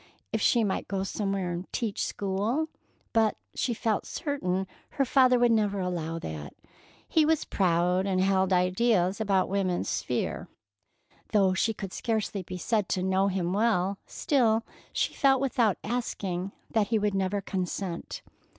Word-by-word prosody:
If 220 - 0
she 235 +2 +4
might 200 -3 -1
go 195 -1 -1
somewhere 195 -2 -2
and 175 +2 -5
"teach 225 -2 -2
school,"—but 220 +1 -1 0.2
she 240 -3 -1
felt 215 -1 -1
certain 195 - -2 0.3
her 275 - +3
father 255 -1 +5
would 240 -1 +4
never 205 -3 +2
allow 170 -3 -2
that. 80 - -6 0.5
He 320 - +3
was 315 0 +2
proud 180 +1 +2
and 185 -1 +1
held 190 0 +2
ideas 185 +1 +2
about 195 -3 +2
woman's 190 -2 0
sphere. - - -2 0.9
Though 195 -3 +4
she 225 +4 +1
could 195 -2 -6
scarcely 220 -3 -1
be 180 0 -7
said 210 +1 0
to 185 - 0
know 190 +1 +2
him 185 -2 -1
well, 200 -3 +1
still 230 -5 +2 0.3
she - - 0
felt 270 -1 +4
without 240 -6 +2
asking 195 -5 -3 0.2
that 215 -2 +2
he 225 - +2
would 210 -1 0
never 195 +1 0
consent. 185 -2 -4
195 Hz, 150 wpm, -28 LUFS, 185-225 Hz, 0.9 s, father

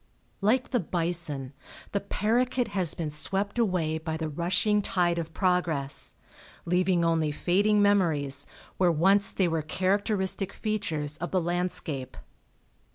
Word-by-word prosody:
Like 245 +6 +2
the 245 - +2
bison, 165 - -2 0.4
the 200 - 0
paroquet 240 +5 0
has 185 -5 -1
been 160 -3 -3
swept 195 +9 -2
away 175 -8 +1
by 160 0 -4
the 160 -1 -3
rushing 180 +7 +1
tide 175 -3 +1
of 165 -1 -5
progress, 170 -7 +1 0.5
leaving 180 0 +2
only 160 -2 +1
fading 205 +7 +2
memories 155 -9 +2 0.3
where 180 -2 +4
once 195 +5 +3
they 190 - +1
were 165 -1 0
characteristic 190 +3 -1
features 160 -9 -2
of 175 +2 -4
the 185 - +1
landscape. 170 -6 -2
175 Hz, 130 wpm, -27 LUFS, 160-200 Hz, 0.5 s, where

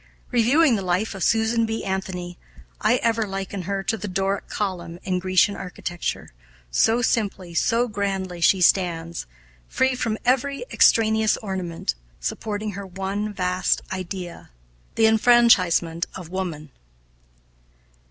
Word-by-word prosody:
Reviewing 250 +4 +4
the 200 - -2
life 185 +4 0
of 190 -3 -4
Susan 225 +1 +2
B. 225 0 -3
Anthony, 190 -2 -4 0.5
I 240 - +4
ever 225 -2 +1
liken 195 0 -4
her 195 -1 -1
to 225 - -1
the 205 - -5
Doric 195 +1 -1
column 175 -4 -4
in 185 -1 -1
Grecian 185 +2 +3
architecture, 175 - -5 0.4
so 225 - +3
simply, 195 -7 -1
so 230 +8 +2
grandly 195 -4 -3
she 185 +1 +4
stands, 170 - +1 0.4
free 260 0 +1
from 230 -3 -1
every 275 - +1
extraneous 220 -1 +4
ornament, 185 - -3 0.3
supporting 210 - -3
her 200 0 -7
one 195 +3 -3
vast 180 -2 0
idea 185 -1 -6 0.5
the 225 - +4
enfranchisement 220 -8 +4
of 180 -4 -8
woman. 170 -6 -5
195 Hz, 125 wpm, -23 LUFS, 180-225 Hz, 0.5 s, Reviewing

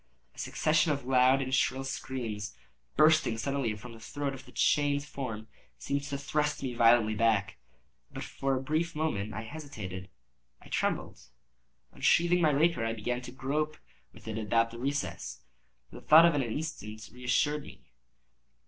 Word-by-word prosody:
A - - -15
succession 155 0 +2
of 140 -3 -2
loud 130 +1 +4
and 130 0 -4
shrill 135 0 +2
screams, 115 -6 -4 0.4
bursting 155 -6 +4
suddenly 135 -2 -1
from 115 +3 -10
the 115 - -12
throat 140 +4 -4
of 135 - -10
the - - -13
chained 145 -1 +2
form, 115 -7 -6 0.3
seemed 140 0 -2
to 140 -1 -3
thrust 150 +1 -1
me 130 -2 -2
violently 115 -2 +5
back. 105 -3 +1 0.6
For 135 0 -2
a 130 - -4
brief 160 +4 -1
moment 110 -10 -1
I 110 - -4
hesitated—I 105 -10 -10
trembled. - - -1 0.7
Unsheathing 175 +1 +3
my 160 - +5
rapier, 150 -2 +2
I 115 0 0
began 120 +3 -3
to 125 - -8
grope 150 +4 -2 0.3
with - - -16
it 110 0 -3
about 115 +2 +1
the 115 - -9
recess; 140 +3 -3 0.5
but - - -10
the - - -25
thought 160 +2 +9
of 170 - +5
an 145 - +1
instant 110 -5 -5
reassured 125 +4 +1
me. - - -13
130 Hz, 155 wpm, -30 LUFS, 115-145 Hz, 0.7 s, thought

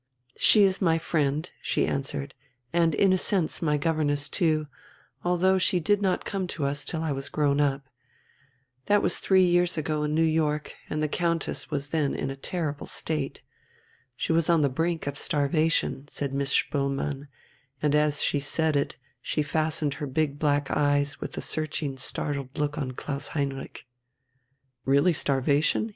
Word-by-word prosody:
"She 210 - +6
is 190 -1 +2
my 165 -3 +3
friend," 155 -1 0
she - - +1
answered, 140 0 -3 0.4
"and 165 -2 +3
in 190 +3 +4
a 185 - +2
sense 185 -5 +1
my 150 -3 +2
governess 145 -2 0
too, 155 -4 +1 0.6
although 180 +2 +3
she 180 0 +2
did 205 +5 +2
not 190 -2 0
come 195 -2 -2
to 145 - -1
us 145 +1 -1
till 160 +2 -3
I 160 - -1
was 135 0 -3
grown 145 -1 +1
up. 140 -1 +1 1.0
That 205 0 +4
was - - +1
three 190 -1 +4
years 175 -1 +3
ago, 155 0 -1
in 150 0 -1
New 165 - +3
York, 155 -2 0 0.2
and 155 0 -1
the - - +2
Countess 170 +1 -1
was 140 0 -3
then 150 -3 0
in 135 - -2
a - - -5
terrible 150 +1 -3
state. 150 -4 -2 0.7
She 160 - -1
was 165 0 +2
on 165 -3 +4
the 140 - +3
brink 165 +5 -1
of 140 -1 -3
starvation," 155 -2 +1
said 140 -2 -4
Miss 140 0 -1
Spoelmann, 140 0 0 0.5
and 150 -1 +1
as 150 -1 +2
she 145 - +1
said 155 +2 0
it 140 - -1 0.2
she 150 - -1
fastened 155 -1 0
her 145 - -2
big 145 +1 -1
black 145 -2 +1
eyes 145 0 +1
with - - -6
a - - -2
searching, 155 -2 -2
startled 140 0 -4
look 150 0 -1
on 130 -3 -3
Klaus 140 +2 -4
Heinrich. 135 -1 -4 1.0
"Really 140 +6 +4
starvation?" 145 - +1
150 Hz, 170 wpm, -27 LUFS, 140-165 Hz, 1.0 s, She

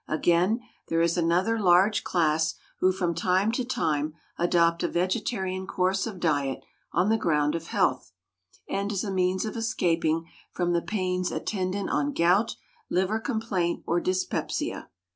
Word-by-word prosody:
Again, 175 +8 +2 0.3
there 165 0 +2
is 170 0 +2
another 180 +6 +2
large 190 +2 +4
class 160 -2 +1 0.2
who 185 - +4
from 180 -2 -1
time 185 +5 +2
to 250 +2 -1
time 155 - -1 0.2
adopt 170 -1 +2
a - - +1
vegetarian 190 0 -1
course 190 +3 0
of 200 -5 -7
diet 145 -5 0 0.3
on 180 +4 +2
the 225 0 +2
ground 150 -4 +1
of 165 0 -4
health, 130 - 0 0.6
and 200 +1 -2
as 195 -3 -1
a 200 - -3
means 185 0 +1
of 215 - -4
escaping 165 -7 0 0.2
from 175 -1 0
the 170 - +2
pains 185 -3 -1
attendant 195 -1 -2
on 285 +1 0
gout, 190 +6 +3 0.3
liver 190 +4 +1
complaint, 220 -8 -1
or 170 +1 +1
dyspepsia. 185 0 -2
180 Hz, 150 wpm, -27 LUFS, 170-200 Hz, 0.6 s, large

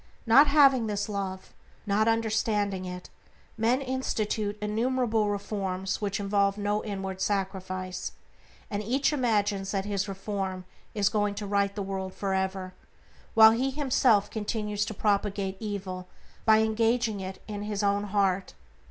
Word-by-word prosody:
Not 270 +6 +7
having 275 -5 +5
this 205 -1 -2
Love, 195 -2 -5 0.3
not 210 +2 +2
understanding 215 -4 0
it, 180 0 -7 0.4
men 235 +4 +2
institute 220 -5 -2
innumerable 225 0 0
reforms 195 -1 -3
which 205 -1 -1
involve 200 0 +1
no 205 +1 -1
inward 195 -2 -4
sacrifice, 185 -2 -2 0.6
and 205 0 -1
each 265 +8 +1
imagines 205 -7 +1
that 195 -1 -1
his 205 0 -1
reform 195 -1 -4 0.3
is 205 -2 +2
going 205 -2 0
to 205 - -4
right 200 0 0
the 205 - -3
world 190 -1 -4
for 195 -1 -2
ever, 190 -1 -2 0.6
while 220 0 +9
he 250 +4 +1
himself 255 -7 +2
continues 210 -1 -2
to 220 - -6
propagate 200 -2 0
evil 190 -4 -5 0.4
by 220 0 +6
engaging 225 0 +1
it 190 0 -6
in 205 -1 -5
his 210 0 -3
own 200 0 +1
heart. 195 -2 0
205 Hz, 140 wpm, -28 LUFS, 195-220 Hz, 0.6 s, while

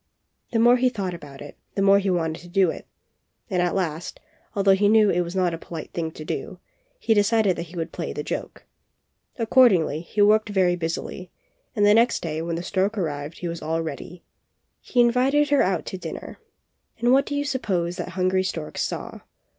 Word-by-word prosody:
The 230 - 0
more 240 +2 +6
he 255 +1 +3
thought 195 -6 -4
about 145 -5 -10
it, 145 - -12 0.2
the 195 - +1
more 200 0 +6
he 200 0 -1
wanted 165 -3 -1
to 175 - -13
do 180 -1 +2
it; - - -10 0.6
and 180 -1 +1
at 175 0 0
last, 170 -3 -3 0.4
although 195 -1 +4
he 205 +1 +3
knew 215 -2 +5
it 175 - +1
was 175 +1 -5
not 180 -2 +1
a 165 - -5
polite 165 -3 -8
thing 165 -2 -2
to 155 - -9
do, - - -5 0.4
he 440 - +1
decided 205 -2 +3
that 170 +1 -6
he 175 - -13
would 165 0 -4
play - - -4
the - - -5
joke. - - -6 0.7
Accord 245 +1 +5
ingly, 160 -3 0
he 200 - -7
worked 215 +1 +4
very 185 -3 +2
busily, 170 +1 -5 0.5
and 205 - +3
the 205 - +6
next 235 +2 +3
day 160 -1 -3
when 165 0 -3
the 170 - -4
stork 195 +4 -1
arrived 150 -3 -3
he 175 - -5
was 170 0 -5
all 165 +1 -1
ready. 160 +3 -7 0.6
He 250 - -2
invited 265 +5 +3
her 285 - +5
out 185 -3 0
to 190 - -6
dinner, - - -8 0.6
and 240 +1 +2
what 275 +1 +4
do 285 - -3
you 285 0 -1
suppose 185 -11 -1
that - - -4
hungry 185 0 +2
stork 165 -4 -5
saw? - - -4
185 Hz, 210 wpm, -24 LUFS, 170-220 Hz, 0.7 s, more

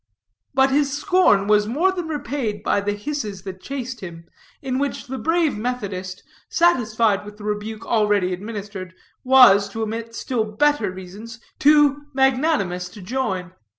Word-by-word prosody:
But 265 0 +4
his 280 0 +2
scorn 360 - +3
was 210 0 +3
more 320 - +2
than 355 -3 -4
repaid 270 -8 -3
by 200 - +1
the 205 0 -1
hisses 210 -4 -5
that 190 -2 -8
chased 255 -2 -5
him, 170 -3 -9 0.3
in 260 -1 -2
which 285 0 -2
the 265 -1 -6
brave 325 -4 +1
Methodist, 200 -6 -4 0.3
satisfied 225 - +2
with 210 0 -11
the 210 - -12
rebuke 210 +1 -4
already 210 -5 +2
administered, 200 -2 -7 0.3
was, 250 -6 +6
to 225 +2 -4
omit 230 +1 -5
still 240 -2 -1
better 220 +1 +1
reasons, 195 +5 -10 0.2
too 290 -1 +4
magnanimous 265 - +1
to 205 +2 -12
join. 190 -5 -3
225 Hz, 150 wpm, -22 LUFS, 200-270 Hz, 0.3 s, was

